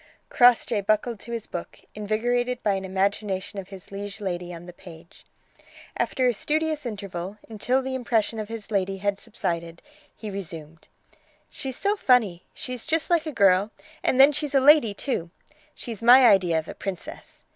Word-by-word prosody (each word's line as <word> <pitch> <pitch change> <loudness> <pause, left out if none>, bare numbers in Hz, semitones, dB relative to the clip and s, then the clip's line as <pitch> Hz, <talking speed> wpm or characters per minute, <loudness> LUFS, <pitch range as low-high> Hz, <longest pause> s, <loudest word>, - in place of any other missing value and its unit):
Crossjay 245 -3 +4
buckled 215 +2 0
to 235 - -9
his 230 -2 -4
book, 175 - -7
invigorated 240 +4 -1
by 205 - +2
an 195 0 -3
imagination 195 +1 -1
of 190 - -8
his 195 -1 -11
liege 200 +1 -6
lady 180 -3 -4
on 170 0 -9
the 175 - -10
page. 170 -2 -15 0.7
After 255 -1 0
a 245 - +3
studious 305 +3 -1
interval, 200 -3 -6
until 245 +4 0
the 265 0 -4
impression 230 -3 0
of 215 - -4
his 225 -1 -7
lady 195 -1 0
had 200 0 -1
subsided, 170 -6 -4 0.4
he 215 -2 -7
resumed: 165 -5 -8 0.6
"She's 265 -2 -6
so 405 +1 +1
funny. 230 - +2
She's 250 0 -6
just 325 +2 0
like 330 -2 +2
a - - -2
girl, 195 -4 +4 0.3
and 260 - +1
then 275 +2 +8
she's 295 -1 -3
a - - +7
lady, 265 -6 +5
too. 200 - -3 0.5
She's 230 -3 -7
my 250 +2 +8
idea 185 -6 +4
of 160 - -3
a - - -6
princess. 185 0 -8
210 Hz, 170 wpm, -25 LUFS, 190-250 Hz, 0.7 s, then